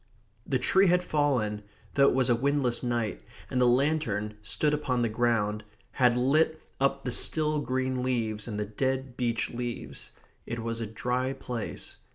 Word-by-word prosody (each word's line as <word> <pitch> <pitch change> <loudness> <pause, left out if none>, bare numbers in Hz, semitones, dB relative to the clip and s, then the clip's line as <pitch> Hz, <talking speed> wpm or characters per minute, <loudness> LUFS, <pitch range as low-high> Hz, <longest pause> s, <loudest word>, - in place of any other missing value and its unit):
The 130 - +2
tree 190 +10 +4
had 180 0 +3
fallen, 130 -10 0 0.3
though 140 0 +5
it - - 0
was 130 -2 +3
a 120 - +4
windless 135 -1 +1
night, 120 - -1 0.3
and 125 - +1
the 125 - +5
lantern, 120 -5 +1
stood 150 +9 +1
upon 130 -5 0
the 115 - +1
ground, 110 -2 0 0.3
had 125 -2 +3
lit 155 +5 +2 0.2
up 135 0 +1
the 125 - -1
still 155 +4 +2
green 130 -2 -1
leaves 115 -4 -1
and 105 -2 -4
the 105 - -1
dead 130 +4 -2
beech 115 -2 -1
leaves. 120 - -5 0.4
It 120 - -3
was 115 0 -2
a 110 - -2
dry 125 +4 -1
place. 125 -4 -5
125 Hz, 170 wpm, -28 LUFS, 115-135 Hz, 0.4 s, though